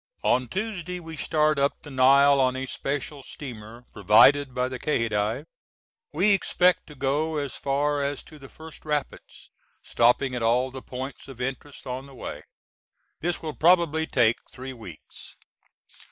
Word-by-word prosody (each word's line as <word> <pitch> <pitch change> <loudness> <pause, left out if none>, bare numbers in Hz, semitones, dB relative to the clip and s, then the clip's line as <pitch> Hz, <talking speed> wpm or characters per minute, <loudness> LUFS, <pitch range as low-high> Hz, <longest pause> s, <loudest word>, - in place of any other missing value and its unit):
On 125 0 +2
Tuesday 180 - -4
we 165 -2 -9
start 155 0 +1
up 140 +1 0
the 145 - -10
Nile 140 +2 +5
on 130 0 +2
a 130 0 -3
special 140 +2 -4
steamer 120 -4 -9
provided 130 +8 +5
by 125 0 0
the 130 -1 -6
Khedive. 110 -7 -1 0.7
We 210 - +3
expect 180 -2 +2
to 150 - -12
go 145 +4 -1
as 140 -3 -3
far 145 +1 0
as 140 -1 -3
to 155 - -15
the 135 -1 -12
first 160 0 -12
rapids 150 -2 -5 0.3
stopping 125 +3 +2
at 125 - -3
all 125 +3 +2
the 130 0 -8
points 130 +2 -7
of 135 -3 -11
interest 135 +2 -5
on 130 +2 -5
the 135 - -14
way. - - -7 0.8
This 175 0 -2
will 155 -1 -4
probably 160 -2 +3
take 115 -2 +3
three 130 +1 -8
weeks. 105 -10 -12
140 Hz, 155 wpm, -25 LUFS, 125-155 Hz, 0.8 s, Nile